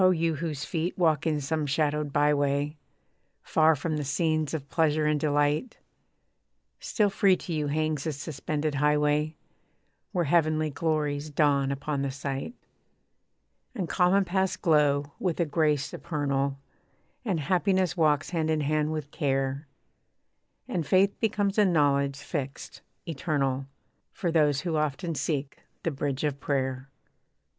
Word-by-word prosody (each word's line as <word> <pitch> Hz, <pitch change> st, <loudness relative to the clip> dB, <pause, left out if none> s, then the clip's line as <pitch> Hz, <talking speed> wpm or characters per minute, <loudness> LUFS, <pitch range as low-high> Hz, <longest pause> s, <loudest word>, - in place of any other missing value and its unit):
you 165 Hz, -2 st, +1 dB
whose 155 Hz, -2 st, -4 dB
feet 170 Hz, +2 st, -2 dB
walk 160 Hz, -4 st, +2 dB
in 155 Hz, -2 st, +1 dB
some 150 Hz, +1 st, -2 dB
shadowed 150 Hz, 0 st, 0 dB
by 145 Hz, +1 st, +3 dB
way, 145 Hz, +1 st, 0 dB, 0.7 s
Far 160 Hz, 0 st, +4 dB
from 155 Hz, +2 st, -2 dB
the 150 Hz, -, -2 dB
scenes 155 Hz, +2 st, 0 dB
of 140 Hz, -3 st, -5 dB
pleasure 155 Hz, -1 st, +1 dB
and 150 Hz, 0 st, +2 dB
delight, 145 Hz, -, +1 dB, 1.0 s
Still 210 Hz, -3 st, +1 dB
free 195 Hz, -1 st, +4 dB
to 175 Hz, -, -6 dB
you 150 Hz, -2 st, -1 dB
hangs 155 Hz, -1 st, -1 dB
this 155 Hz, -4 st, -2 dB
suspended 150 Hz, +1 st, -3 dB
highway, 150 Hz, +2 st, +2 dB, 0.8 s
Where 180 Hz, -4 st, 0 dB
heavenly 155 Hz, -1 st, +2 dB
glories 150 Hz, -1 st, -1 dB
dawn 140 Hz, -2 st, +2 dB
upon 140 Hz, +1 st, -2 dB
the 140 Hz, -, -1 dB
sight. 140 Hz, -, -4 dB, 1.2 s
And 185 Hz, -4 st, -2 dB
common 185 Hz, +3 st, +3 dB
paths 190 Hz, +1 st, 0 dB
glow 145 Hz, -4 st, +2 dB
with 180 Hz, -3 st, -1 dB
a 170 Hz, -, +3 dB
grace 150 Hz, -2 st, +1 dB
supernal, 140 Hz, -3 st, -2 dB, 0.7 s
And 195 Hz, -9 st, -1 dB
happiness 185 Hz, +2 st, +1 dB
walks 155 Hz, -3 st, +2 dB
hand 160 Hz, -3 st, 0 dB
in 155 Hz, -1 st, +1 dB
hand 150 Hz, +1 st, 0 dB
with 150 Hz, -2 st, -4 dB
care, 135 Hz, 0 st, -1 dB, 1.0 s
And 170 Hz, -, -1 dB
faith 190 Hz, +6 st, +3 dB
becomes 210 Hz, -2 st, 0 dB
a -, -, +7 dB
knowledge 140 Hz, -5 st, +2 dB
fixed, 140 Hz, -1 st, -6 dB, 0.2 s
eternal, 135 Hz, -4 st, -1 dB, 0.5 s
For 175 Hz, -6 st, -2 dB
those 150 Hz, -4 st, +3 dB
who 170 Hz, -3 st, -1 dB
often 150 Hz, +2 st, -1 dB
seek 145 Hz, -1 st, -3 dB, 0.2 s
the 165 Hz, -, 0 dB
bridge 140 Hz, -1 st, -3 dB
of 145 Hz, -2 st, -1 dB
prayer. 130 Hz, -1 st, -2 dB
150 Hz, 140 wpm, -27 LUFS, 140-165 Hz, 1.2 s, a